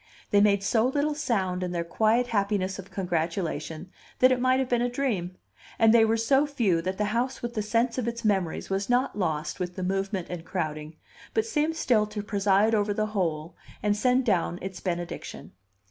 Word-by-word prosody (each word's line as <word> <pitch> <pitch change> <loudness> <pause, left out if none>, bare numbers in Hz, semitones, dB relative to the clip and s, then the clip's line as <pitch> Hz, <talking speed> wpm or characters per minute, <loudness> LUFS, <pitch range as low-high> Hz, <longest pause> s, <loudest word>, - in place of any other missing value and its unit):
They 205 - +5
made 200 -1 +3
so 225 +3 +2
little 290 +3 0
sound 195 -11 -1
in 180 -1 -3
their 170 -1 -1
quiet 220 +8 +2
happiness 200 -4 -1
of 195 - -9
congratulation 165 -2 -3 0.3
that 255 +1 +5
it 255 - +2
might 255 +1 +3
have 265 - 0
been 245 -1 +1
a 245 - +1
dream; 220 -9 -2 0.4
and 225 0 +5
they 230 -1 +6
were 225 +1 +2
so 270 +6 +3
few 215 -12 +1
that 185 +2 -3
the 210 - 0
house 245 +2 -1
with 240 0 -3
the 215 - -1
sense 230 +3 0
of 240 - -2
its 235 -1 -4
memories 190 -4 0
was 195 +2 -1
not 245 +2 +1
lost 160 -6 -2
with 180 -1 -4
the 185 - -4
movement 195 0 -1
and 175 -2 -5
crowding, 155 -3 -4 0.4
but 440 - +2
seemed 320 -6 0
still 230 -9 +2
to 210 -1 -5
preside 205 +1 +2
over 205 -1 +1
the 215 - +1
whole, 165 -4 -2 0.3
and 205 -1 +2
send 250 +4 +2
down 175 -5 +1
its 190 0 -6
benediction. 175 -2 -5
205 Hz, 200 wpm, -27 LUFS, 180-240 Hz, 0.4 s, they